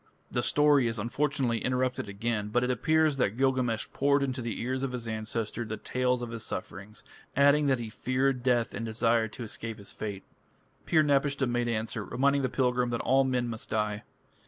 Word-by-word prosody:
The 120 - 0
story 145 -1 +4
is 115 0 -2
unfortunately 125 +1 0
interrupted 125 -4 -1
again, 105 +1 -2
but 120 +4 +1
it 125 - +1
appears 155 +4 +2
that 110 -4 0
Gilgamesh 130 -4 +1
poured 140 0 +3
into 130 -1 -2
the 115 -3 -4
ears 130 +2 -2
of 135 -2 -2
his 120 -2 -5
ancestor 110 +1 -3
the 110 -1 -5
tale 125 +4 0
of 120 - -5
his 115 -1 -5
sufferings, 100 +2 -7 0.3
adding 145 +1 +5
that 135 -1 +3
he 115 -2 -6
feared 130 +2 0
death 120 -2 +1
and - - -4
desired 115 0 +1
to 125 - -6
escape 115 0 -6
his 100 -2 -10
fate. 100 -3 -5 0.6
Pir 155 -2 +4
napishtim 140 -3 +1
made 120 0 0
answer, 110 -1 -2
reminding 140 +5 +1
the 130 - 0
pilgrim 125 -1 +1
that 120 -1 -1
all 135 +2 +3
men 125 -2 0
must 115 -1 -6
die. 105 -1 -1
120 Hz, 190 wpm, -29 LUFS, 110-135 Hz, 0.6 s, adding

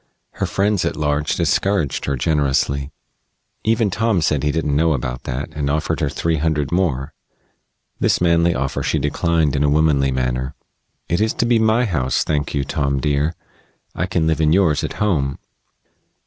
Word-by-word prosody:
Her - - -3
friends 100 -1 +1
at - - -1
large 75 0 0
discouraged 100 -8 0
her 70 - -1
generously. 70 0 0 0.7
Even 110 -2 +1
Tom 115 -2 +1
said 75 -3 +1
he 75 0 +1
didn't 75 -2 -1
know 80 +2 +3
about 60 -2 -4
that, 65 +5 -4
and 75 -2 -2
offered 75 +2 -1
her - - 0
three 80 -1 -1
hundred 75 -2 -1
more. 80 -6 0 0.9
This - - +2
manly 85 -1 +3
offer 70 0 -2
she - - 0
declined 80 -3 +1
in 70 - +1
a 75 - +3
womanly 75 -2 +3
manner. 65 +1 -2 0.5
"It 85 +4 0
is 110 0 +1
to - - +1
be 120 -1 +3
my 110 +2 +3
house, 65 - 0
thank 75 -1 -2
you, 70 - 0
Tom, 70 -1 -1
dear. 75 +4 0 0.6
I 90 - -2
can 90 -3 0
live 80 0 +1
in 75 -1 +3
yours 85 -6 +3
at - - -3
home." 70 -10 0
75 Hz, 175 wpm, -20 LUFS, 70-85 Hz, 0.9 s, know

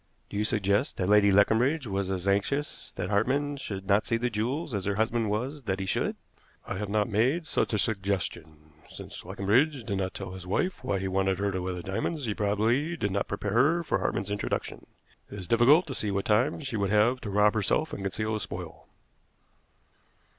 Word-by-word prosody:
"Do 100 - -4
you 105 - +1
suggest 105 +3 +1
that 90 0 -1
Lady 105 -1 +6
Leconbridge 120 +9 +3
was 100 -2 -2
as 95 0 -3
anxious 120 +10 -1
that 90 - -4
Hartmann 140 +8 +1
should 95 -7 -6
not 100 +2 +2
see 115 - +1
the 120 +1 -1
jewels 125 +8 -2
as 100 -3 -2
her 100 0 0
husband 110 +1 0
was 130 +8 -2
that 95 -2 -1
he 95 - -2
should?" - - -1 0.5
"I - - -4
have 105 -1 -3
not 105 +1 +1
made 125 +10 +1
such - - 0
a 110 - +1
suggestion. 90 -7 -2 0.2
Since - - -9
Leconbridge 125 +8 +1
did 100 -3 -2
not 95 -1 -3
tell 95 -2 -6
his 95 -1 -9
wife 180 - -1
why 125 -6 0
he 95 0 -2
wanted 95 0 +1
her 100 +1 0
to 95 -1 -2
wear 90 0 -3
the 90 - -6
diamonds, 135 - -2
he 110 - -1
probably 115 +11 +1
did 100 -9 -1
not 100 +1 -1
prepare 100 0 -3
her 155 +9 +3
for - - 0
Hartmann's 95 +1 -2
introduction. 105 - -3 0.4
It 100 - -8
is 90 -3 -7
difficult 130 - +5
to 140 - -5
see 105 - -2
what 100 0 -1
time 120 +9 +2
she 135 -6 -3
would 100 -1 0
have 110 +5 +3
to 105 - -5
rob 105 +1 +4
herself 110 +9 0
and - - -5
conceal 110 +3 -2
the 110 - -1
spoil." - - -7
105 Hz, 210 wpm, -28 LUFS, 100-125 Hz, 0.5 s, Lady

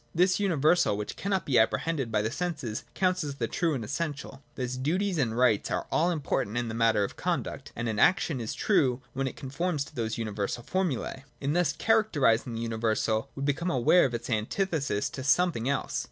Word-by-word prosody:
This 185 +3 +3
universal 170 - +3
which 105 - -5
cannot 195 -2 -1
be 130 -5 +3
apprehended 135 +2 +1
by 105 -1 +1
the 110 - -1
senses 140 -8 -3
counts 185 -2 +1
as 145 -2 -4
the 115 -4 -2
true 165 +2 0
and 120 - -3
essential. 145 0 -4
Thus, 125 -1 -3
duties 175 +7 0
and 115 -4 0
rights 125 -5 +3
are - - -1
all 170 +3 +3
important 135 - -1
in 120 -1 -1
the - - -4
matter 115 -2 +3
of 100 - -4
conduct: - - -3
and 120 +1 -3
an 110 -2 -1
action 155 -2 +3
is 110 - -4
true 130 - +2
when 135 0 -1
it - - -5
conforms 150 +3 -2
to - - -15
those 115 -4 -2
universal 110 +1 -3
formulae. 155 -6 -2 0.2
In 140 +1 -1
thus 175 -4 +2
characterising 145 - +2
the 115 - -3
universal, 110 -1 0
we 135 - -4
become 145 +5 0
aware 135 +6 +4
of 125 -3 -1
its 115 - -5
antithesis 135 - 0
to 130 - -6
something 140 -3 +2
else. 140 -2 -1
135 Hz, 195 wpm, -28 LUFS, 115-170 Hz, 0.2 s, aware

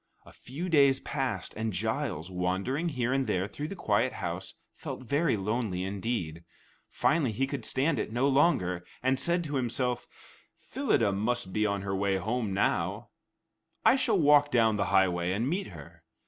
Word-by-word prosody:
A - - -15
few 150 +9 -6
days 140 -5 +4
passed, 135 -4 -3
and 110 0 -2
Giles, 85 0 -2
wandering 95 - -1
here 125 -4 -1
and 135 -2 0
there 95 -2 0
through 145 +7 -6
the 195 - -6
quiet - - +1
house, - - -5 0.2
felt - - -7
very 140 0 +1
lonely 100 -2 -2
indeed. 95 -4 -3 0.5
Finally 140 -8 +1
he 135 +6 0
could 135 -4 -5
stand 140 0 +1
it - - -3
no 125 +4 +1
longer, 130 - +2 0.2
and 130 0 +2
said 170 +5 +1
to 145 -3 -2
himself, 125 0 -1 0.5
"Phyllida 120 - 0
must 105 0 -1
be 105 +1 +2
on 100 -1 -2
her 95 -1 -2
way 95 0 +1
home 110 +3 -2
now; 95 - 0 0.8
I - - +7
shall 250 -6 +2
walk 145 -3 +5
down 115 -4 +3
the 100 - 0
highway 90 -2 +2
and 110 +6 -1
meet 180 +7 -1
her." 85 -1 -12
120 Hz, 170 wpm, -29 LUFS, 95-140 Hz, 0.8 s, I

